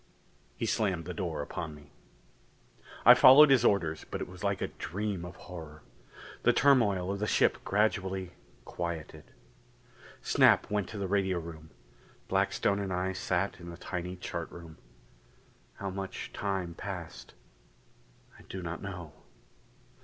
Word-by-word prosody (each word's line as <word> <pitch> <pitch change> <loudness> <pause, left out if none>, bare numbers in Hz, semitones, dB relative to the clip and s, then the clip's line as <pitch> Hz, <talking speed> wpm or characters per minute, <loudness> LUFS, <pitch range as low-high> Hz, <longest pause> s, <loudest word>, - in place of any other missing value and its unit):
He - - -2
slammed 95 -7 0
the 90 - -5
door 85 -7 -3
upon 80 0 -6
me. 75 -1 -16 1.1
I - - +11
followed 140 +3 +9
his 130 -3 +5
orders 85 -8 +2
but - - -4
it - - -4
was - - -11
like - - 0
a - - -1
dream 100 +1 -4
of 90 - -8
horror. 80 -4 -10 0.6
The - - +5
turmoil 105 -10 +3
of 100 - -3
the 105 - -1
ship - - +3
gradually 95 -3 0 0.3
quieted. 85 -3 -5 1.0
Snap - - +4
went 105 -2 -1
to 110 - -7
the 100 -1 -2
radio 95 -1 +1
room; 80 -2 -8 0.6
Blackstone 100 0 +1
and 100 -2 -3
I 90 +1 -1
sat 95 0 -1
in 85 0 -9
the 85 - -9
tiny 90 0 -5
chart 85 -2 -5
room; 85 -2 -12 1.0
how 100 -1 -5
much 95 0 -6
time 95 -4 -2
passed, 90 -2 -8 1.0
I - - -14
do 95 -1 -6
not 85 0 -5
know. 90 -6 -7
90 Hz, 145 wpm, -30 LUFS, 85-100 Hz, 1.1 s, I